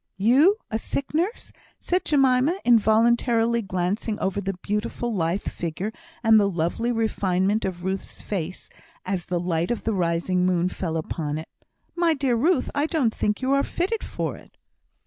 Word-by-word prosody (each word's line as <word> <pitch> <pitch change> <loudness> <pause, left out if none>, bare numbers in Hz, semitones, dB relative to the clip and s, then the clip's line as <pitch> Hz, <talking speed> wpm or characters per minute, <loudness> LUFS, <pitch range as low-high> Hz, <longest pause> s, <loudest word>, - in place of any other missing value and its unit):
"You, 270 - +5
a 220 - 0
sick 275 +5 -4
nurse!" 355 +9 -1 0.3
said 360 +1 -1
Jemima, 270 +3 +3
involuntarily 235 +1 +3
glancing 195 +3 -2
over 200 0 -1
the 195 -1 -3
beautiful 210 +3 -2
lithe 175 +1 0
figure, 175 +6 -4 0.3
and 225 -1 +6
the 200 -1 +3
lovely 175 +7 -1
refinement 205 -3 0
of 180 -2 -4
Ruth's 190 +1 -3
face 185 -3 -4 0.4
as 185 -2 -3
the 175 -1 -1
light 170 -1 -1
of 240 - -2
the 225 - 0
rising 180 0 0
moon 180 -1 +2
fell 165 -3 -3
upon 155 -1 -3
it. 160 - -7 0.5
"My 340 -2 +2
dear 270 -4 +1
Ruth, 290 +4 +2
I 290 +2 +1
don't 285 -10 +1
think 210 +4 -1
you 260 - +1
are 275 - +4
fitted 385 +9 -2
for - - -3
it!" - - -19
215 Hz, 165 wpm, -24 LUFS, 180-250 Hz, 0.5 s, and